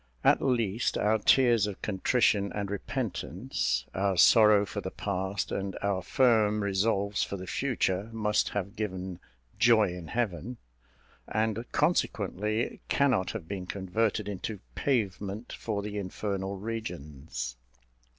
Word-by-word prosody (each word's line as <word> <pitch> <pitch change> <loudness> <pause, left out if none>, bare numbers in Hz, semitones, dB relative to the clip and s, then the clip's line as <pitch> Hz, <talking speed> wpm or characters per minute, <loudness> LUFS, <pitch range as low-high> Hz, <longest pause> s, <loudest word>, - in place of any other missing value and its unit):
At - - +5
least, 115 -4 +1
our 110 +1 +2
tears 120 -2 +4
of 100 - -6
contrition 100 0 +2
and 100 -1 -3
repentance, - - -2
our 95 -1 0
sorrow 105 +1 +7
for - - -5
the - - -4
past, 95 0 -3
and 95 -1 -3
our 100 -2 +1
firm 105 -1 +3
resolves 100 0 +1
for 100 - -4
the 95 - -7
future, 105 -4 -1
must 105 -2 +1
have 100 +1 -4
given 95 -4 -4 0.4
"joy 110 -4 +5
in 90 -2 -8
heaven," 115 +2 -2 0.7
and 110 +2 -1
consequently 110 - 0
cannot 130 -10 +2
have 100 -8 -6
been 95 -1 -5
converted 100 +4 -1
into 105 +1 -4
pavement 105 -4 -1
for 105 -3 -3
the 105 0 -4
infernal 100 0 -3
regions. 75 - -5
100 Hz, 125 wpm, -29 LUFS, 95-110 Hz, 0.7 s, sorrow